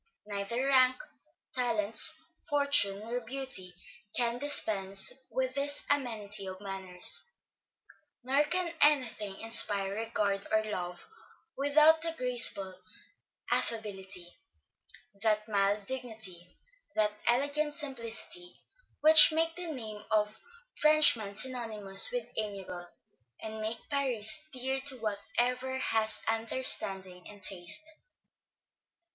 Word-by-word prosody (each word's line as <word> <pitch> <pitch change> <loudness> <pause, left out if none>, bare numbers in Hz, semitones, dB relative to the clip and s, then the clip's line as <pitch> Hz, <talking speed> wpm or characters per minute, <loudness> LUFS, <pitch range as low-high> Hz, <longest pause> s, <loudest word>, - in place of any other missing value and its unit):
Neither 210 +5 -3
rank, 260 -2 +4 0.6
talents, 230 +2 0 0.3
fortune, 280 -9 +3
nor 235 +3 -4
beauty, 245 -7 -4 0.4
can 240 0 +1
dispense 195 -9 +4 0.2
with 260 0 -2
this 285 +1 -1
amenity 215 -8 -2
of 185 0 -8
manners; 190 - +1 0.9
nor 270 +3 +2
can 355 +2 +1
any 290 -4 +6
thing 205 -3 -8
inspire 205 -3 +2
regard 205 -2 -2
or 215 0 +2
love, 180 -4 -6 0.5
without 305 +3 +4
that 330 0 -2
graceful 200 -7 +1 0.7
affability, 195 -5 -3 1.0
that 215 0 0
mild 200 -1 0
dignity, 220 -9 -5 0.4
that 210 -1 +1
elegant 285 +4 +1
simplicity, 280 +6 -5 0.4
which 310 +1 +10
make 325 +1 -1
the 350 -2 -3
name 215 -6 -8
of 215 0 0 0.4
Frenchman 300 -10 +4
synonymous 225 - 0
with - - -4
amiable, 195 -5 -6 0.5
and 220 0 -7
make 220 +2 -3
Paris 280 0 +1
dear, 265 +1 -2
to 265 -1 -1
whatever 245 +4 -2
has 220 -4 0
understanding 200 -5 -1
and 205 -2 -14
taste. 195 - +1
225 Hz, 105 wpm, -30 LUFS, 200-275 Hz, 1.0 s, which